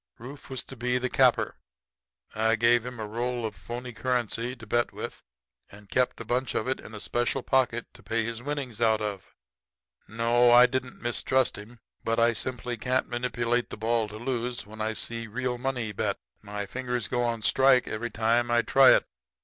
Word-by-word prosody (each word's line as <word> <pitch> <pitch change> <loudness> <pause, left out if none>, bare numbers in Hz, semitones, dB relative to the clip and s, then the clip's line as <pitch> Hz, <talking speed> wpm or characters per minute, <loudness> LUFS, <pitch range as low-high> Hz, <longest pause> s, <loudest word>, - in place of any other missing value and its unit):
Rufe 135 +5 -10
was 130 -2 -2
to 135 - -10
be 125 +1 0
the 125 0 -2
capper. - - +3 0.8
I 110 +1 +2
gave 115 +1 +3
him 125 -2 -7
a 110 - -3
roll 120 +2 -2
of 110 - -3
phony 120 +7 -7
currency 125 0 -1
to 115 -2 -12
bet 120 +2 +1
with - - -7 0.5
and 105 0 -15
kept 125 0 +1
a 115 - -6
bunch 125 +3 -1
of 110 - -1
it 130 - -1
in 110 - -10
a - - -6
special 120 +4 -1
pocket 125 -3 +1
to - - -15
pay 115 0 -1
his 115 0 -4
winnings 135 -5 -4
out 110 -2 +4
of. 100 -3 -5 0.7
No; 120 +2 +3
I 120 +1 +9
didn't 130 0 -3
mistrust 125 +2 +1
him; 115 +3 -11 0.2
but 115 0 0
I 115 0 +4
simply 125 +1 -3
can't 130 +3 0
manipulate 120 0 -1
the - - -7
ball 115 +1 +1
to 105 +1 -9
lose 120 0 -3
when 110 +1 -9
I 110 +1 0
see 115 +1 -4
real 125 +2 -2
money 125 -4 -2
bet. 100 - -1 0.2
My 105 -1 -5
fingers 125 +1 -3
go 125 - 0
on 115 -2 -1
a - - -10
strike 130 0 +4
every 115 +2 -3
time 115 +1 +1
I 120 0 +3
try 135 -1 +7
it. - - +1
120 Hz, 200 wpm, -27 LUFS, 110-125 Hz, 0.8 s, I